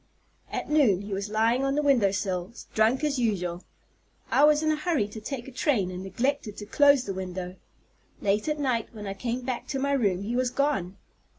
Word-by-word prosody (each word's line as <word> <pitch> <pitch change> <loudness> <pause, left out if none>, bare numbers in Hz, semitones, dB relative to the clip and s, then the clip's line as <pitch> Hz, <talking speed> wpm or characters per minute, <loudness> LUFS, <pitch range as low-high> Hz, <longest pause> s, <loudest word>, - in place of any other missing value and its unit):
At - - -3
noon 260 -12 +3
he 200 0 -5
was 200 +1 -3
lying 225 +4 +2
on 275 0 +1
the 300 - +1
window 255 -8 +4
sill, 190 +1 -3 0.2
drunk 225 +6 +2
as 290 -3 0
usual. 180 -6 -1 0.7
I - - +4
was 300 0 +4
in 310 - +3
a - - +2
hurry 305 - 0
to 215 +1 -9
take 245 +2 -5
a - - -8
train, 240 -8 0
and 180 0 -6
neglected 225 +4 -2
to 205 - -6
close 285 +4 +5
the 200 - -4
window. 185 -1 -5 0.6
Late 205 +4 0
at 300 0 0
night, 255 -6 -1
when 210 -2 -8
I 195 - -3
came 240 +5 -3
back 250 -1 -4
to 270 - -2
my 280 +1 0
room, 200 -9 +1
he 230 +4 -2
was 255 0 +1
gone. 250 -10 -1
230 Hz, 210 wpm, -27 LUFS, 195-275 Hz, 0.7 s, close